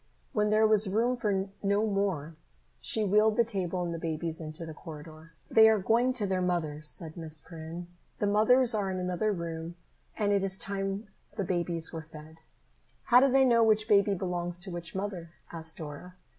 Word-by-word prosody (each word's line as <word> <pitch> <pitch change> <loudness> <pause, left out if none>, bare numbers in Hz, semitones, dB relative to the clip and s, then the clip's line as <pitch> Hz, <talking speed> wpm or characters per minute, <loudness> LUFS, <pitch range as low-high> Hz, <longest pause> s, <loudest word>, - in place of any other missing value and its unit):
When 210 -1 +2
there 215 +1 +4
was 215 -2 +4
room 230 +5 +1
for 200 -4 -1
no 200 +2 +1
more, 195 -7 -1 0.4
she 220 - 0
wheeled 210 +2 +3
the 235 - +5
table 185 -5 -2
and 170 -1 -3
the 165 - -5
babies 165 0 -3
into 155 +1 -7
the 160 - -7
corridor. 155 +1 -11
"They 220 0 +7
are 220 - +4
going 230 +6 +2
to 230 -5 -2
their 190 -1 0
mothers," 155 -4 -2
said 160 -2 -2
Miss 160 -3 -1
Perrin. 165 +2 -8 0.3
"The - - -1
mothers 225 +5 +4
are 205 -3 0
in 185 - -3
another 180 +4 -1
room 170 -2 -5 0.4
and 205 -2 +1
it 200 -1 +2
is 190 0 -1
time 195 +2 -3 0.3
the 200 - 0
babies 170 -2 -1
were 165 - -4
fed." 155 +1 -12 0.7
"How 245 0 +6
do 270 0 +4
they 270 0 +5
know 235 -2 +5
which 215 -1 +3
baby 200 -1 +4
belongs 175 -1 -3
to 190 0 -7
which 170 0 -7
mother?" 190 -4 -5 0.2
asked 160 -1 -4
Dora. 160 +4 -8
190 Hz, 190 wpm, -29 LUFS, 165-210 Hz, 0.7 s, They